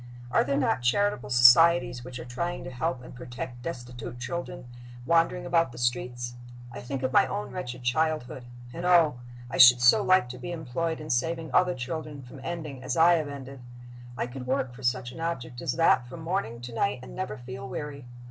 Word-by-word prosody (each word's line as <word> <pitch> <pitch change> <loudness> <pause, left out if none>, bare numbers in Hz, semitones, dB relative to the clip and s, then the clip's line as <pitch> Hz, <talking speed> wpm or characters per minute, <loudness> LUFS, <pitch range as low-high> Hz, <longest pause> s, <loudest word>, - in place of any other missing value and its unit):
Are - - +4
there 140 0 -1
not 135 -2 +1
charitable 125 - +1
societies 120 +1 +6
which 125 0 -8
are 120 - -8
trying 170 +9 -4
to 130 - -7
help 130 0 -3
and - - -11
protect 125 0 -7
destitute 120 -5 -7
children 170 0 -5 0.4
wandering 170 +3 +2
about 165 -5 +2
the 120 - -12
streets? 120 0 -2 0.4
I - - -8
think 130 +1 -5
of 130 0 -1
my - - +5
own 105 -5 -4
wretched 125 0 -6
childhood 130 -1 -1 0.3
and 170 - -6
oh! 170 -7 +4 0.3
I 120 - -5
should 125 -1 +9
so 125 - +6
like 185 -8 +3
to 125 0 -8
be 175 - -6
employed 160 +1 -3
in 155 0 -5
saving 165 +5 -1
other 180 -1 +3
children 145 +2 -6
from 130 +2 -12
ending 155 -6 -5
as 130 0 -3
I 170 +2 +6
have 160 -3 0
ended. 135 -2 -9 0.6
I - - -1
could 125 +1 -8
work, 130 -1 -1
for 130 - -13
such 125 0 -1
an - - -11
object 130 -7 -4
as 125 - -1
that, 165 -7 +3
from 145 +7 -9
morning 160 - -3
to 120 -1 -8
night, - - -1
and - - -10
never 105 - -4
feel 125 +2 -8
weary. 140 -1 -6
130 Hz, 200 wpm, -27 LUFS, 125-165 Hz, 0.6 s, should